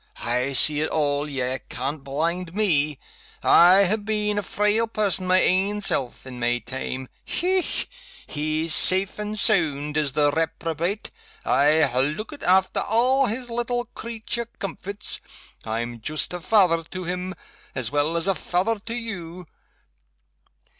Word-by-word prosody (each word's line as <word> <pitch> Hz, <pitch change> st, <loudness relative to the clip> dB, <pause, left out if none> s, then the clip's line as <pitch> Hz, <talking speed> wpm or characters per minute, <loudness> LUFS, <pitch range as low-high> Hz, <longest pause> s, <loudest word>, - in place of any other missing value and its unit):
_ -, -, -7 dB
I 125 Hz, +3 st, 0 dB
see 150 Hz, +3 st, +2 dB
it 155 Hz, -, 0 dB
all 145 Hz, -1 st, 0 dB
ye 130 Hz, -2 st, -2 dB
can't 135 Hz, +3 st, -3 dB
blind 165 Hz, +6 st, -2 dB
Me 155 Hz, -9 st, +2 dB, 0.5 s
I 185 Hz, +3 st, +7 dB
ha' 210 Hz, +3 st, 0 dB
been 210 Hz, -1 st, -1 dB
a -, -, -1 dB
frail 210 Hz, +3 st, +1 dB
person 200 Hz, -4 st, +1 dB
my 185 Hz, 0 st, +5 dB
ain 195 Hz, +3 st, +2 dB
self, 135 Hz, -12 st, 0 dB
in 125 Hz, -2 st, -8 dB
my 120 Hz, 0 st, +1 dB
time. 130 Hz, +1 st, -5 dB, 0.2 s
Hech! 370 Hz, +1 st, 0 dB, 0.4 s
he's 155 Hz, +2 st, -2 dB
safe 190 Hz, +5 st, +4 dB
and 210 Hz, 0 st, -4 dB
sound, 150 Hz, -8 st, +1 dB
is 145 Hz, -3 st, 0 dB
the 145 Hz, 0 st, +3 dB
reprobate. 165 Hz, +5 st, -2 dB, 0.3 s
I 150 Hz, +3 st, +4 dB
ha' 130 Hz, -3 st, +2 dB
lookit 185 Hz, -, -2 dB
after 190 Hz, +1 st, +3 dB
a' 255 Hz, +4 st, +2 dB
his 240 Hz, +2 st, -3 dB
little 240 Hz, +1 st, -2 dB
creature 235 Hz, 0 st, -3 dB
comforts 200 Hz, +2 st, -4 dB, 0.4 s
I'm 115 Hz, +1 st, -4 dB
joost 155 Hz, +8 st, -2 dB
a 180 Hz, -, -4 dB
fether 175 Hz, -3 st, +3 dB
to 185 Hz, +3 st, -7 dB
him, 180 Hz, +2 st, -4 dB, 0.4 s
as 125 Hz, -2 st, -1 dB
well 145 Hz, +3 st, +1 dB
as 165 Hz, -, +2 dB
a 195 Hz, -, +3 dB
fether 190 Hz, +5 st, 0 dB
to 225 Hz, +3 st, -6 dB
you. 180 Hz, -7 st, -6 dB
175 Hz, 145 wpm, -24 LUFS, 145-210 Hz, 0.5 s, I